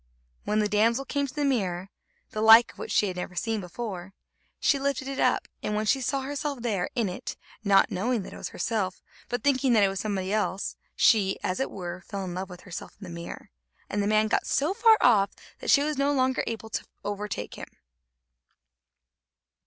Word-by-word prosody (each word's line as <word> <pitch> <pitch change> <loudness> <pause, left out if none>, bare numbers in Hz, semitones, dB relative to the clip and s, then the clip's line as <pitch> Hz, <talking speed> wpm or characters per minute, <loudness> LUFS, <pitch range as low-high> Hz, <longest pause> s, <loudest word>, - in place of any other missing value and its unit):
When 210 - 0
the 210 -1 +3
damsel 230 +6 +2
came 280 0 -1
to 255 - -10
the 295 -1 0
mirror, 195 -8 -1 0.4
the 215 - -3
like 225 +2 +8
of - - -20
which - - -5
she - - +3
had 185 -2 -3
never 180 0 -5
seen 220 +4 -1
before, 195 0 -6 0.4
she 280 - +3
lifted 275 -1 -1
it 275 0 -4
up, - - +2
and 210 - -2
when 215 +1 0
she 270 +5 +2
saw 270 +2 0
herself 285 +1 -3
in 215 +1 0
it, 180 - -5 0.3
not 200 -2 +4
knowing 225 +3 0
that - - -9
it - - -9
was - - -5
herself, 200 -5 -2 0.3
but 245 - -2
thinking 270 -3 +3
that 215 -3 +5
it 195 - +4
was 195 0 -4
somebody 200 -2 -2
else, 205 -2 -1 0.2
she, 200 -4 +4
as 185 - -1
it 265 - 0
were, 180 -1 -6
fell 200 +1 -5
in 180 - -5
love 185 +1 -4
with 180 -1 -10
herself 185 -2 -8
in - - -11
the 180 - -8
mirror, 170 0 -8 0.4
and 205 - 0
the 200 - 0
man 215 0 +3
got - - 0
so 300 +7 +1
far 450 +1 +6
off 205 -5 +5 0.3
that - - -5
she 285 - +6
was 300 -2 -1
no 280 +1 +3
longer 260 -2 +1
able 225 -1 -5
to - - -3 0.2
overtake 205 0 -4
him. - - -8
215 Hz, 205 wpm, -27 LUFS, 195-265 Hz, 0.4 s, like